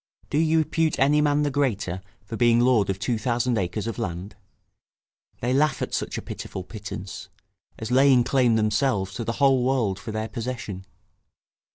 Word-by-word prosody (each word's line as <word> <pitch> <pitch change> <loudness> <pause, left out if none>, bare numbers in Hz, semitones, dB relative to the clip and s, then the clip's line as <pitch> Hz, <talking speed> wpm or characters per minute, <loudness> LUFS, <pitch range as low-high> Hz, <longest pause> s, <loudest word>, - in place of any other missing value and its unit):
Do 145 - +2
you 160 0 +3
repute 160 0 +1
any 145 +2 +4
man 150 0 +2
the 145 - 0
greater 110 -10 -1 0.2
for 115 - -6
being 120 0 +4
lord 120 -5 +3
of 95 - -1
two 110 +3 -1
thousand 120 0 0
acres 95 +3 -3
of 115 -3 -4
land? 90 +4 -5 1.1
they 125 +1 0
laugh 140 0 +2
at - - -4
such - - -2
a - - -5
pitiful 95 - -6
pittance, 100 -1 -8 0.5
as 110 +2 -6
laying 130 -1 +5
claim 125 -3 +2
themselves 105 -2 +1
to 115 - -4
the 115 - -2
whole 135 -1 +3
world 125 -7 0
for 110 - -7
their 110 +1 -3
possession. 115 -5 -5
120 Hz, 175 wpm, -25 LUFS, 105-135 Hz, 1.1 s, laying